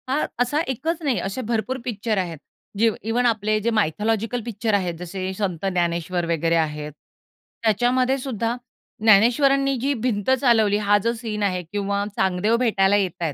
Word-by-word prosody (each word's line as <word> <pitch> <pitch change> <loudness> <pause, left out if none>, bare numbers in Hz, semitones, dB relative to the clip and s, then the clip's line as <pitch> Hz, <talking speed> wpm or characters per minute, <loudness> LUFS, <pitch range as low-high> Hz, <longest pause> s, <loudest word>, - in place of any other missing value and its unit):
हा 285 +4 +1
असा 250 +5 +1
एकच 315 +7 -2
नाही, 275 -5 +1
असे 195 +7 -3
भरपूर 235 +2 -2
पिक्चर 220 -2 -2
आहेत. 175 -4 -2 0.4
जे 225 +2 +4 0.2
इव्हन 245 +2 +1
आपले 215 -2 +1
जे 230 - 0
मायथॉलॉजिकल 220 +3 0
पिक्चर 220 -1 -2
आहेत, 185 -4 +1
जसे 185 +2 -4
संत 190 -4 -2
ज्ञानेश्वर 175 -1 -1
वगैरे 165 0 +1
आहेत. 150 -2 -1 0.7
त्याच्यामध्येसुद्धा 245 +1 +1 0.5
ज्ञानेश्वरांनी 270 +6 +4
जी 280 +2 +1
भिंत 220 -3 -1
चालवली, 220 -5 +4
हा 205 0 +3
जो 230 +1 +1
सीन 220 -3 -4
आहे 185 -2 0
किंवा 200 0 -1
चांगदेव 190 +4 +1
भेटायला 205 -5 +2
येत 195 -3 +1
आहेत, 160 -4 -1
215 Hz, 155 wpm, -23 LUFS, 190-240 Hz, 0.7 s, जे